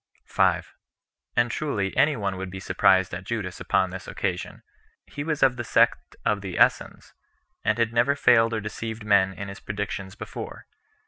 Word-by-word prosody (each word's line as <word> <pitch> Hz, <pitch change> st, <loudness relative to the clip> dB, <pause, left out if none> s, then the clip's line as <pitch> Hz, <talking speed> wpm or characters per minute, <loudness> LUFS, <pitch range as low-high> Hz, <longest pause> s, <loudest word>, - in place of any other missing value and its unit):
5. -, -, +1 dB, 0.6 s
And 120 Hz, 0 st, +2 dB
truly 105 Hz, -11 st, -2 dB
any 145 Hz, +2 st, +4 dB
one 100 Hz, -4 st, -2 dB
would 95 Hz, 0 st, -5 dB
be 95 Hz, +1 st, -7 dB
surprised 95 Hz, 0 st, +3 dB
at 90 Hz, +1 st, -5 dB
Judas 100 Hz, -4 st, -4 dB
upon 95 Hz, -2 st, +1 dB
this 95 Hz, 0 st, -8 dB
occasion. 95 Hz, -3 st, -4 dB, 0.4 s
He 145 Hz, -, -6 dB
was 150 Hz, -2 st, -1 dB
of 130 Hz, -2 st, +4 dB
the 120 Hz, -, -3 dB
sect -, -, +2 dB
of 105 Hz, -1 st, +1 dB
the 95 Hz, -2 st, -5 dB
Essens, -, -, +1 dB, 0.5 s
and 110 Hz, +1 st, +1 dB
had 115 Hz, -1 st, +1 dB
never 120 Hz, +4 st, +3 dB
failed 115 Hz, -4 st, +4 dB
or 110 Hz, -, -2 dB
deceived 110 Hz, +1 st, -5 dB
men 100 Hz, -2 st, +4 dB
in 100 Hz, +2 st, -7 dB
his 100 Hz, +1 st, -8 dB
predictions 105 Hz, -1 st, -5 dB
before. -, -, -8 dB
105 Hz, 175 wpm, -25 LUFS, 95-120 Hz, 0.6 s, any